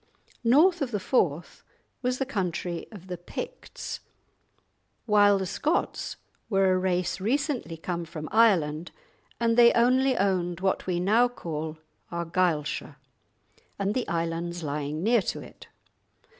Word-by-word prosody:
North 315 +9 +5
of 275 - 0
the 210 -4 -2
Forth 175 - 0 0.4
was 250 0 0
the 270 - -1
country 180 -7 -3
of 195 -5 -11
the 180 -2 -6
Picts; - - -7 1.1
while 205 -2 +5
the 190 - -2
Scots 300 - -1 0.3
were 195 -3 +3
a - - +2
race 185 0 0
recently 255 - -1
come 170 +1 -4
from 155 -2 -7
Ireland, 175 -8 +3 0.5
and 230 -1 +2
they 235 -1 +8
only 255 +2 +3
owned 180 -3 0
what 190 0 0
we 175 -2 0
now 220 +7 +4
call 160 -9 -5 0.3
Argyleshire, 170 -3 -1 0.8
and 200 +1 0
the 255 - -1
islands 170 +1 -2
lying 150 +2 -3
near 230 +1 +4
to - - -3
it. - - -12
185 Hz, 130 wpm, -27 LUFS, 170-235 Hz, 1.1 s, they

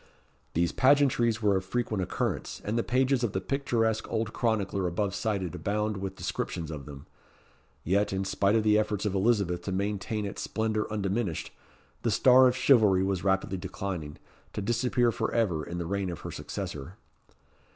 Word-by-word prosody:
These 85 +1 +2
pageantries 130 -5 +3
were 100 -2 +4
of 95 - -3
frequent 110 0 -1
occurrence, 90 - -2
and 105 - -1
the 115 - +2
pages 130 +1 +1
of 115 - 0
the 95 - 0
picturesque 115 -1 -1
old 110 -1 -1
chronicler 100 -5 0
above 95 +3 -1
cited 100 -5 -2
abound 105 +1 -1
with 95 0 -5
descriptions 80 -4 -4
of 75 -3 -7
them. 70 -2 -10 0.8
Yet, 100 +4 +1
in 95 0 -1
spite 100 +2 +2
of 110 - +3
the 105 0 +4
efforts 105 -1 -1
of 105 - 0
Elizabeth 95 -4 +1
to 95 - -2
maintain 105 +2 -2
its 100 - -5
splendour 110 -1 -1
undiminished, 100 -3 -2 0.5
the - - 0
star 130 0 +6
of 125 - +1
chivalry 110 -8 +5
was 95 -2 -1
rapidly 95 0 +1
declining, 90 -4 -5 0.4
to - - -3
disappear 120 +2 +2
for 110 0 -2
ever 90 -10 +1
in 85 +2 -6
the 85 - -3
reign 100 +1 -1
of 85 - -6
her - - -6
successor. 75 +6 -6
100 Hz, 170 wpm, -28 LUFS, 95-115 Hz, 0.8 s, star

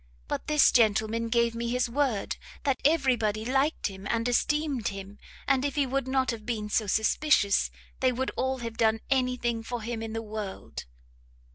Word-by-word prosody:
But - - -4
this 300 -1 +5
gentleman 225 0 +2
gave 235 0 +2
me 235 0 -3
his 250 +1 +1
word 245 -4 -1 0.3
that 275 -3 0
every 275 -4 +4
body 215 -1 -1
liked 270 +5 +1
him 195 0 -4
and 230 0 0
esteemed 285 -1 +1
him, 195 +1 -7 0.3
and 265 -1 +3
if 285 -1 -1
he 285 -2 +2
would 270 0 -1
not 260 -1 +1
have 225 -2 -7
been 210 -2 -3
so 215 0 +1
suspicious, 220 +1 +3 0.3
they 255 -1 +3
would 260 +2 -2
all 260 0 -1
have 230 -1 -6
done 225 -1 +2
any 255 -2 +2
thing 235 -2 -1
for 235 0 -5
him 230 0 -4
in 225 -1 -5
the 225 0 -3
world." 210 -2 -6
235 Hz, 185 wpm, -28 LUFS, 220-265 Hz, 0.3 s, this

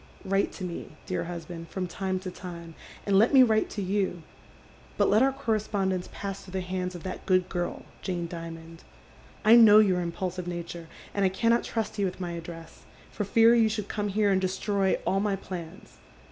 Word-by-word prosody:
" - - -22
Write 195 +1 +1
to - - -8
me, 175 -3 -6
dear - - -2
husband, 165 -1 -7
from 190 -1 -3
time 190 +1 -2
to 185 -1 -6
time, 170 -2 -9 0.3
and 195 -1 +4
let 230 +6 +4
mo 260 -1 +9
wiite 220 -2 +2
to 205 - -4
you, 190 -3 -1 0.7
but - - +3
let 215 +3 +5
our 270 +1 +4
conespoiulence 205 -7 -1
pass 195 -1 -5
through 185 - -13
the 190 - -1
hands 180 0 -3
of 175 - -8
that 185 - -6
good 185 -1 +3
girl, 175 0 -3 0.2
Jane 175 -3 -3
Dimond. 165 -1 -8 0.7
I 220 +2 +8
know 220 -3 +9
j'our 185 -4 +3
impuliiive 180 +1 -4
nature, 170 -1 -6 0.3
and 200 - 0
I 190 - +4
cannot 230 +5 +2
trust 220 -2 -3
you 200 - +2
with 185 0 -4
my 175 -2 -3
address, 165 -1 -9 0.3
for 205 - -3
fear 225 +3 +5
you 225 -2 +4
should 210 -2 -4
come 210 -1 -2
here 205 0 +2
and 190 -1 +2
destroy 190 +1 +1
all 195 - +2
my 200 -1 +1
plans. 170 - -9
190 Hz, 200 wpm, -27 LUFS, 175-205 Hz, 0.7 s, mo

